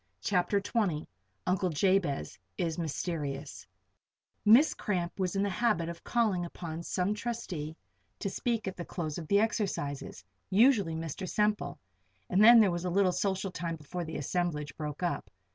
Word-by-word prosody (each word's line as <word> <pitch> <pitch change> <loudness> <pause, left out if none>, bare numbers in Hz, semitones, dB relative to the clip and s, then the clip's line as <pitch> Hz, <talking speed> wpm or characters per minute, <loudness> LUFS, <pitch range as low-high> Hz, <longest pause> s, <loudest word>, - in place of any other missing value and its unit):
CHAPTER 185 - +2
XX 195 -7 0 0.4
UNCLE 185 0 +1
JABEZ 165 - +1 0.2
IS 165 0 -1
MYSTERIOUS 150 - -4 0.8
Miss 235 +9 +7
Cramp 180 -3 -2
was 185 0 0
in 195 - +2
the 205 - +1
habit 185 -6 +1
of 170 0 -8
calling 215 -7 +1
upon 170 -1 -6
some 180 +3 0
trustee 200 -9 -4 0.4
to - - -3
speak 225 +2 -1
at 190 - -3
the 175 - -4
close 165 -3 -4
of 160 - -8
the 200 +3 +4
exercises 185 - -2 0.3
usually 205 -5 +4
Mr. 165 +3 -4
Semple 210 0 0 0.5
and 195 +3 +5
then 235 +1 +10
there 205 -4 +5
was 175 0 -3
a - - 0
little 190 +1 +3
social 190 0 -1
time 170 -1 -3
before 165 +3 -5
the 160 -1 -5
assemblage 150 -2 -2
broke 150 +2 -5
up. 175 - -1
180 Hz, 160 wpm, -30 LUFS, 160-200 Hz, 0.8 s, then